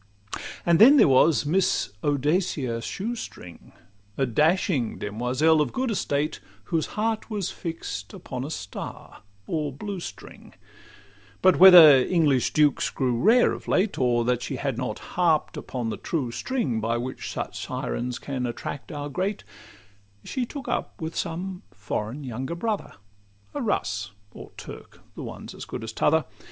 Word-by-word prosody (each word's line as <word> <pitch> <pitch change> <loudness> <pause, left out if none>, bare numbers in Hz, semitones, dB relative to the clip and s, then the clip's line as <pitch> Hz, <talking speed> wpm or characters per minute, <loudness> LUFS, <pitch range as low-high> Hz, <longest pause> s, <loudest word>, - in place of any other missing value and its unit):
And 170 -1 +4
then 270 +7 +9
there - - +7
was 140 +4 +4
the 145 - -3
Miss 190 - +1
Audacia 145 -4 0
Shoestring, 195 - -6 0.5
A 135 - +2
dashing 150 - +1
demoiselle 125 +9 +1
of 150 - 0
good 260 -2 -1
estate, 150 -7 -1 0.2
Whose 160 +8 -1
heart 220 +1 -1
was 205 -5 -2
fix'd 160 - -6
upon 125 -1 -6
a 140 - -5
star 100 -10 -7 0.2
or 150 -3 -2
blue 195 +8 -6
string; - - -10 0.9
But 185 -1 +5
whether 175 -6 +10
English 145 -4 +2
dukes 150 -3 +3
grew 125 -3 -1
rare 235 +5 +5
of - - -9
late, 195 +2 +1
Or 120 -2 +2
that 125 0 +1
she - - -4
had 135 -3 -2
not 125 +1 -3 0.2
harp'd 165 -4 +2
upon 120 -3 -4
the - - -4
true 140 -8 -2
string, 145 - -2
By 115 +2 0
which 125 +2 -5
such - - -5
sirens 120 - -3
can 130 -3 -3
attract 120 +6 -6
our 145 -1 -4
great, 185 +7 -2 0.8
She 255 -3 -3
took 280 +1 -8
up - - -3
with 160 0 -5
some 180 +3 -4
foreign 105 +6 -5
younger 130 +5 -4
brother, 215 +3 -3 0.6
A - - -3
Russ 100 0 -2 0.2
or - - -11
Turk—the - - -11
one - - -8
's - - -8
as - - -8
good - - -6
as 110 -1 -6
t' - - -5
other. 160 +1 +4
150 Hz, 155 wpm, -25 LUFS, 125-180 Hz, 0.9 s, whether